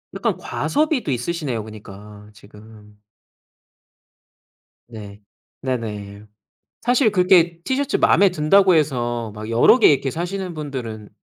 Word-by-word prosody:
약간 - - -1
과소비도 290 - -1
있으시네요. 130 -2 -3
그니까 105 -1 -13
지금. 105 0 -17 1.9
네 105 -2 -11 0.4
네네 105 -5 -5 0.6
사실 245 -2 +2
그렇게 180 -3 +3
티셔츠 275 +5 -1
마음에 200 0 +4
든다고 180 +4 +3
해서 120 -7 -1
막 110 +1 -8
여러 115 - +5
개 225 - +6
이렇게 140 -1 +2
사시는 180 +3 -5
분들은 125 -9 -7
130 Hz, 255 characters per minute, -20 LUFS, 105-180 Hz, 1.9 s, 개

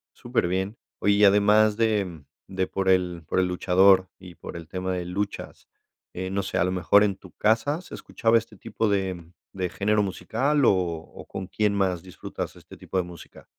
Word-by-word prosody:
Superbién. 95 +5 -1 0.2
Oye, 100 - +3
y 105 +1 +3
además 105 +2 +4
de 100 -8 0 0.3
de 95 -1 -1
por 95 0 -3
el 90 -3 +1
por - - 0
el 90 - +2
luchador, 95 +1 +4
y 90 -2 -12
por - - -9
el 85 -2 -8
tema 95 0 -3
de 90 -1 -2
luchas, 100 +3 -5 0.5
eh, 95 +1 -4
no 100 0 -1
sé, 95 - -3
a 85 - +3
lo 90 - 0
mejor, 95 +3 +4
¿en 100 -2 0
tu 95 - -15
casa 130 +10 +1
se - - -14
escuchaba 115 0 +1
este 110 -1 -5
tipo 110 - -2
de 95 -4 -2 0.2
de 90 -2 -2
género 105 +2 +1
musical, 130 +9 0
o-o 85 -5 -1
con 95 -1 -6
quién 105 +1 0
más 95 -4 0
disfrutas 90 -1 -7
este - - -14
tipo - - -10
de 90 - +2
música? 85 -1 -13
95 Hz, 190 wpm, -25 LUFS, 90-105 Hz, 0.5 s, además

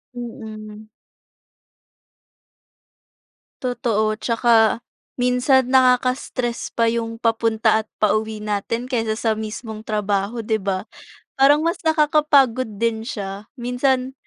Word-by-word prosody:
Mm. 215 -3 -8 2.7
Totoo, 220 -4 0
'tsaka 230 -1 +3 0.4
minsan 250 +1 +3
nakaka-stress 255 -1 +1
pa 230 -1 +2
yung 230 0 -3
papunta 225 -1 +2
at 215 - -38
pauwi 215 0 0
natin 215 +4 -3
kaysa 225 -4 0
sa 220 +1 0
mismong 220 0 -6
trabaho, 210 +1 -1
'di 220 0 0
ba, 195 0 -3 0.5
parang 290 +3 +5
mas 335 +1 -1
naka-kapagod 295 -6 +3
din 230 +1 0
siya, 200 -2 -6
minsan 255 +1 0
230 Hz, 95 wpm, -21 LUFS, 215-250 Hz, 2.7 s, parang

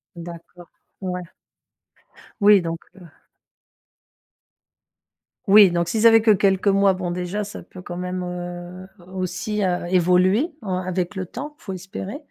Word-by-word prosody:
D'accord, 170 +1 -11 0.3
ouais. 180 -1 -3 1.2
Oui, 205 -2 +7
donc, 165 0 -4 0.2
heu 195 - -16 2.5
Oui, 200 0 +8
donc 170 0 -1
si 220 +4 -1
ça 230 - +8
fait 225 - +6
que 220 - +5
quelques 195 0 +2
mois, 195 -1 +4
bon 185 -2 -3
déjà 180 +4 -3
ça 205 - -8
peut 185 - -13
quand 175 -1 -7
même, 180 0 -4
heu, 175 +1 -7 0.3
aussi, 185 +3 -3
heu, 180 -2 0
évoluer 185 - +3
en 190 -3 -3
avec 185 +1 -3
le 185 -1 -4
temps, 285 - -7
faut 195 - -7
espérer. 190 +5 -7
185 Hz, 140 wpm, -22 LUFS, 175-200 Hz, 2.5 s, Oui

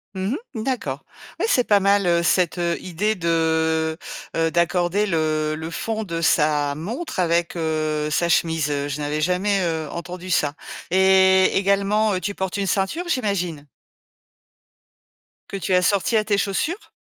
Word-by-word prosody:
Mmh 190 +6 -1 0.2
mh. 220 - -3
D'accord. 255 0 -3 0.4
Oui, - - +1
c'est 250 - +3
pas 205 -1 +5
mal, 200 0 +3
heu, 170 0 +2
cette, 180 0 +2
heu, 170 -1 0
idée 205 +5 -1
de, 160 -2 0 0.4
heu 165 0 +1
d'accorder 175 +3 +1
le 155 -4 0
le 160 +1 -6
fond 220 +6 -3
de 170 -4 -4
sa 150 -3 +2
montre 235 - -5
avec, 170 -1 +1
heu, 155 -2 -1
sa 170 +3 0
chemise. 160 -2 +1
Heu, 145 0 -1
je 145 +1 -4
n'avais 150 +1 -2
jamais, 185 +4 +1
heu, 160 -2 -2
entendu 180 +1 -7
ça. 145 -4 +1 0.4
Et 190 0 +5
également, 200 +2 +2
heu, - - -1
tu 200 +4 -3
portes 190 0 -3
une 200 -1 -1
ceinture, 195 - -1
j'imagine? 180 - -2 1.8
Que - - -6
tu 190 0 -2
assortis 195 +4 +2
à 215 - +1
tes 205 -1 +1
chaussures? 255 - -2
175 Hz, 160 wpm, -22 LUFS, 160-200 Hz, 1.8 s, pas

